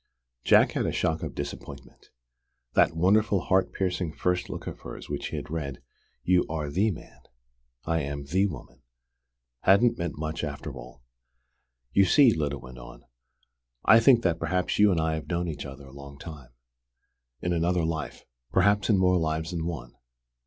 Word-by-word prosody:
Jack - - +5
had - - -1
a - - 0
shock 80 0 -1
of - - -5
disappointment. 70 0 -8 0.6
That 80 - +3
wonderful, 100 +4 +3
heart 95 +1 +1
piercing 90 -4 -2
first 90 +1 -1
look - - -6
of - - -7
hers - - -9
which - - -3
he - - -6
had - - -6
read, 70 -5 -4 0.4
"You 90 0 +3
are 75 -2 -3
the 100 +8 +2
man: 90 - -9 0.7
I 80 0 0
am 70 0 -5
the 95 +7 +2
woman!" 65 -8 -10 0.8
hadn't 115 - +4
meant 85 -3 -3
much 80 +2 -4
after 75 -1 -5
all. 60 0 -12 0.9
"You 100 - +5
see," 125 +5 +6
Lyda 75 -2 -2
went 65 -1 -11
on, - - -12 0.8
"I 110 - +8
think 120 0 +5
that 85 -2 +1
perhaps 90 +2 -1
you 105 0 +6
and 90 -4 +1
I 80 0 0
have 80 -1 -5
known 85 0 -1
each 75 -3 -5
other 70 +1 -11
a 65 - -14
long 70 0 -11
time: 75 -5 -10 0.9
in 90 - -1
another 85 +1 +1
life: 80 -2 -4 0.3
perhaps 100 +3 +3
in 105 - +5
more 90 -1 +3
lives 80 +1 -2
than 85 -2 -3
one. 65 -9 -6
80 Hz, 175 wpm, -27 LUFS, 70-90 Hz, 0.9 s, I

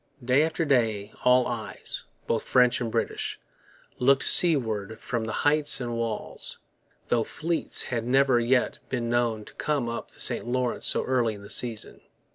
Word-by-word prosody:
Day 130 +3 +4
after 160 +1 0
day 110 -7 +1
all 125 0 +5
eyes, - - -3 0.2
both 115 - -1
French 125 -1 +4
and 115 -2 -2
British, - - -2 0.6
looked 135 +2 +4
seaward 110 - +2
from 120 -2 -3
the 110 - -4
heights 150 0 +3
and 120 -2 -3
walls; 115 -2 -4 0.5
though 120 -2 +2
fleets 165 +7 -1
had 115 -2 -3
never 130 0 +3
yet 125 +2 +1
been 120 -2 -2
known 115 -3 0
to - - -12
come 145 -5 -1
up 115 0 -5
the - - -17
St - - 0
Lawrence 125 0 0
so - - +1
early 120 -4 +1
in 100 - -12
the 100 - -8
season. 115 -3 -1
120 Hz, 165 wpm, -26 LUFS, 115-135 Hz, 0.6 s, all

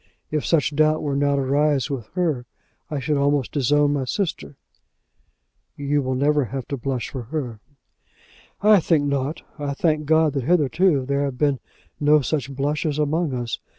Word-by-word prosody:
If 150 -1 -1
such 155 -2 +1
doubt 155 +1 +3
were 145 -2 -1
now 140 0 +2
to 140 - 0
arise 140 0 +1
with 120 -6 -4
her, 155 -9 -1 0.4
I 150 - -2
should 145 +2 0
almost 140 -2 +1
disown 145 +1 +2
my 140 -2 -1
sister." 130 - -3 1.2
"You 145 +1 0
will 130 -1 -2
never 145 +1 +2
have 130 +2 -5
to 140 - -1
blush 130 -1 -3
for 130 - -5
her." 125 -5 -4 1.0
"I 210 -1 +7
think 155 -3 +2
not. 140 +1 -2 0.2
I 140 -1 -3
thank 155 -1 +1
God 160 -1 +3
that 135 -3 -2
hitherto 155 -2 +2
there 140 +1 0
have 135 -3 -4
been 140 -2 +1 0.4
no 150 0 +4
such 140 0 -2
blushes 145 +2 -1
among 150 -1 0
us. 120 -2 -3
145 Hz, 170 wpm, -23 LUFS, 135-150 Hz, 1.2 s, I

